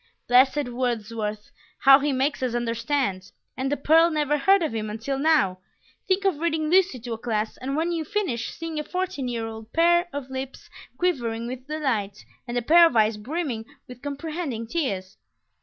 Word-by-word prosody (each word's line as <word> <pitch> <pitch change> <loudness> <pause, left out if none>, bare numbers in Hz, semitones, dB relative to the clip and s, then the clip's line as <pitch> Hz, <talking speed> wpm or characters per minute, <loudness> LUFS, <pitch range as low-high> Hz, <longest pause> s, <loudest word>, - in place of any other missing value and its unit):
Blessed 260 +2 +4
Wordsworth! 225 -4 -3 0.3
How 270 0 +8
he 290 +1 0
makes 270 +2 0
us 250 -2 -1
understand! 235 -4 -1 0.2
And 270 +1 -2
the 290 - 0
pearl 325 +4 +5
never 295 -2 +1
heard 385 +6 +4
of 310 - -2
him 215 -1 -3
until 230 +6 -3
now! 280 -12 +2 0.5
Think 385 +1 +1
of 370 -7 +1
reading 320 -2 0
Lucy 370 -7 +3
to 240 0 -5
a 225 - -6
class, 220 -2 -2
and 270 +2 -4
when 330 +3 0
you 330 -2 -1
finish, 300 - -2
seeing 330 -2 -5
a - - -2
fourteen 360 -6 -3
year 235 -2 -3
old 220 0 -9
pair 345 +1 +4
of 275 -2 -6
lips 265 0 -7 0.3
quivering 235 -10 -1
with 255 +2 -7
delight, 240 -10 -2 0.2
and 240 0 -3
a 240 - 0
pair 335 +6 +7
of 285 - -4
eyes 215 -1 +3
brimming 250 -1 -3 0.2
with 250 -1 -11
comprehending 285 -4 -4
tears! 200 - -3
265 Hz, 180 wpm, -25 LUFS, 230-315 Hz, 0.5 s, How